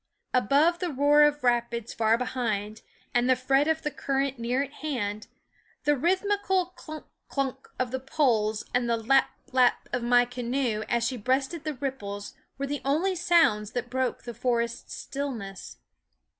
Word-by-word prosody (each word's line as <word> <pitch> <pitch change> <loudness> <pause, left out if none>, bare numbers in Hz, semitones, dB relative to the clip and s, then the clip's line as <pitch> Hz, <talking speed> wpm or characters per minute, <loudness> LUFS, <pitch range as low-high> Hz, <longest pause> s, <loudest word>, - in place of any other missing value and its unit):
Above 285 - +3
the 360 - -1
roar 290 +1 +4
of 295 -1 +4
rapids 235 -2 0
far 225 0 +3
behind, 220 -4 -2 0.3
and 245 +1 +2
the 255 - +6
fret 270 +3 +2
of 320 0 0
t 300 - 0
ne 295 - -20
current 270 -1 -1
near 245 +4 0
at 280 - -9
hand, 215 -9 -3 0.6
the 295 - +3
rhythmical 375 +3 +1
clunk, 310 0 -9 0.2
clunk 270 -1 -3
of 255 -2 -1
the 260 - -2
poles 235 -6 +1
and 245 -1 +1
the 230 - +2
lap, 265 +4 +3 0.2
lap 250 -2 +3
of 245 - 0
my 245 +1 +5
little 245 0 -4
canoe 245 -2 -1
as 235 -1 +1
she 250 +1 -1
breasted 265 +7 0
the 305 -2 -3
ripples 205 -7 -5 0.2
were 275 - -2
the 285 +1 -3
only 315 +8 +1
sounds 330 - +3
that 245 0 -3
broke 260 -1 -1
the 240 - -6
forest 235 0 -1
stillness. 235 -9 -6
255 Hz, 170 wpm, -27 LUFS, 235-285 Hz, 0.6 s, the